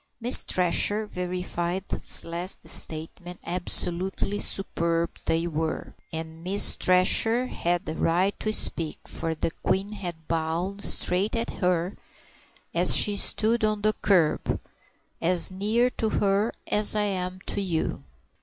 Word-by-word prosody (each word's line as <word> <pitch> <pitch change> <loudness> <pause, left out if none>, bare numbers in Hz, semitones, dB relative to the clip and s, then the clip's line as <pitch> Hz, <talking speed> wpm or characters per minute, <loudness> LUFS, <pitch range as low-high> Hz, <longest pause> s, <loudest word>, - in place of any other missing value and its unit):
Miss 245 +2 +7
Thresher 195 +4 +1
verified 180 -1 -4
this - - -2
last 170 +3 -4
statement, 170 +3 -3
absolutely 180 +3 +2
superb 170 -3 -1 0.2
they 165 +1 0
were, 160 -1 -4 0.2
and 160 0 -8
Miss 195 +3 +5
Thresher 225 +7 +2
had 175 -6 -3
a 155 - -3
right 180 +5 0
to 215 - -2
speak, 165 -6 +1
for 165 0 -4
the 160 - -3
Queen 195 +5 -2
had 175 -6 -8
bowed 170 +5 -3
straight 190 +5 +4
at 230 0 -3
her, 180 0 -2 0.8
as - - +2
she 205 - +5
stood 220 +3 0
on 215 -1 -1
the 215 0 +2
kerb, 175 -6 +1 0.6
"as 180 +2 +5
near 220 +6 0
to 220 - -2
her 205 +2 0
as 210 +1 +1
I 210 - +1
am 185 -2 -3
to 200 - -3
you." 165 - -3
185 Hz, 135 wpm, -25 LUFS, 170-205 Hz, 0.8 s, Miss